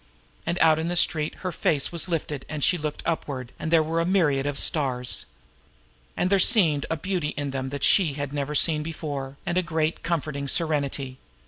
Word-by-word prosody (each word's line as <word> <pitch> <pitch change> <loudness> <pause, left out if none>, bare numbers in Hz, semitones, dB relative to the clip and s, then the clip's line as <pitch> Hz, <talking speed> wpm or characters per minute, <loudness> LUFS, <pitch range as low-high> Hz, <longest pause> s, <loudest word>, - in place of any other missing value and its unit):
And 170 +1 0
out 160 -1 +5
in 160 - -2
the 175 - -1
street 155 -3 +3
her 185 - 0
face 150 -3 0
was 170 +1 -1
lifted 150 -4 -3
and 150 -2 -4
she - - +4
looked 150 -3 -4
upward, 135 -6 -3
and 160 - -3
there 165 -1 +4
were 165 +2 0
myriad 145 -6 +1
stars. 125 -5 0 0.9
And 180 - 0
there 200 - +4
seemed 170 -9 +4
a 160 - -1
beauty 175 -2 -2
in 145 -1 -2
them 135 -1 -3
that 140 0 -5
she 175 -8 +4
had 145 0 -4
never 145 +1 -2
seen 155 +1 +3
before, 145 -4 -5
and 175 0 +1
a - - +2
great, 160 -2 -1
comforting 155 -4 -2
serenity. 140 -4 -1
155 Hz, 190 wpm, -25 LUFS, 140-165 Hz, 0.9 s, out